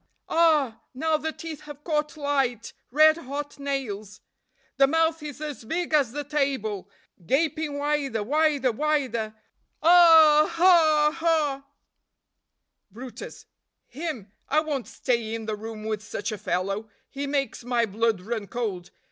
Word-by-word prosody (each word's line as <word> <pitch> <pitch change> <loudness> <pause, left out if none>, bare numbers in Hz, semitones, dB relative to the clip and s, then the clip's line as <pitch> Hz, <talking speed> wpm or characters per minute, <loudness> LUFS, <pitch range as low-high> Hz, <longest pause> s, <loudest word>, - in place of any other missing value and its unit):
Ah, 305 -8 +2
now 320 +4 +1
the 315 +1 -2
teeth 315 -2 -8
have 295 0 -10
caught 300 -1 -1
light 270 -6 -1 0.2
red 310 +4 +5
hot 290 -1 -6
nails. 240 -8 -4 0.6
The 275 - +6
mouth 325 +2 +1
is 295 -2 -7
as 300 -5 -6
big 330 +7 -3
as 280 -6 +3
the 295 +3 -4
table, 265 -9 -2 0.3
gaping 295 - 0
wider, 285 -6 -1
wider, 290 0 +2
wider. 250 -5 -1 0.5
Ah! 325 -3 +7
ah! 320 -3 +5
ah!" 295 -5 +1 1.2
brutus. 240 +5 -10 0.2
" - - -56 0.2
him; 250 - -5 0.2
I 305 +2 +3
won't 290 -5 -3
stay 230 -3 -2
in 225 -1 -6
the 215 -1 -2
room 220 0 -8
with 215 -1 -2
such 210 -1 -5
a 215 - -4
fellow, 195 +5 -2 0.2
he 280 +1 -4
makes 275 -3 -2
my 240 -1 +1
blood 220 -1 0
run 215 +1 -4
cold. 200 -7 -4
280 Hz, 140 wpm, -25 LUFS, 225-310 Hz, 1.2 s, Ah